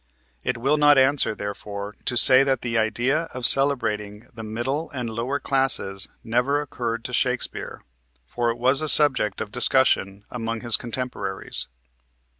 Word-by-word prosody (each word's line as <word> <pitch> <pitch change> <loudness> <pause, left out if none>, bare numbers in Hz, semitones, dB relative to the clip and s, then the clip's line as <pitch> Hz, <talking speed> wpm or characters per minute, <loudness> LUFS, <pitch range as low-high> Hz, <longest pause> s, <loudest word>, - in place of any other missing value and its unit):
It 125 - -2
will 135 +6 0
not 145 -1 +5
answer, 135 -4 +2
therefore, 100 0 -7
to 120 - -1
say 130 +3 +8
that 135 -3 -1
the 120 -1 -4
idea 120 +8 0
of 125 -1 0
celebrating 110 -7 +3
the 115 - -9
middle 120 +8 -4
and 125 -4 -5
lower 120 +6 -3
classes 135 -9 -1 0.2
never 125 +5 0
occurred 115 -5 -5
to 125 - -7
Shakespeare, 125 0 -2 0.4
for 120 - -2
it 115 - -3
was 130 +4 +2
a 155 - -1
subject 130 -10 +3
of 105 - -6
discussion 105 -5 +1
among 115 -2 -5
his 120 -2 +3
contemporaries. 120 -5 -5
120 Hz, 150 wpm, -23 LUFS, 110-135 Hz, 0.4 s, say